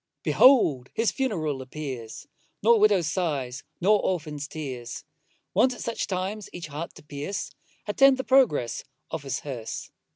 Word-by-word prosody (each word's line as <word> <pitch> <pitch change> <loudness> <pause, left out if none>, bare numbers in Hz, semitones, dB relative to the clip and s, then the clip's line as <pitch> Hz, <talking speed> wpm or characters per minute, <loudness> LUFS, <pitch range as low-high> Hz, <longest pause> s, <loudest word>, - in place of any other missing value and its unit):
Behold 150 - +5
his 225 0 +2
funeral 160 - -1
appears, 130 -4 -7 0.4
Nor 230 +1 +6
widow's 205 -5 +4
sighs, 145 -6 -2 0.2
nor 205 +3 +4
orphan's 150 -5 -2
tears, 130 -7 -6 0.5
Wont 255 -1 +3
at - - -9
such 230 - -2
times 195 +2 -3
each 175 - -6
heart 150 +4 -6
to - - -13
pierce, 150 +6 -5 0.3
Attend 270 +5 +5
the 260 - -2
progress 245 - +3 0.3
of - - -3
his 135 -1 -3
hearse. 125 -6 -6
160 Hz, 140 wpm, -26 LUFS, 140-210 Hz, 0.5 s, Nor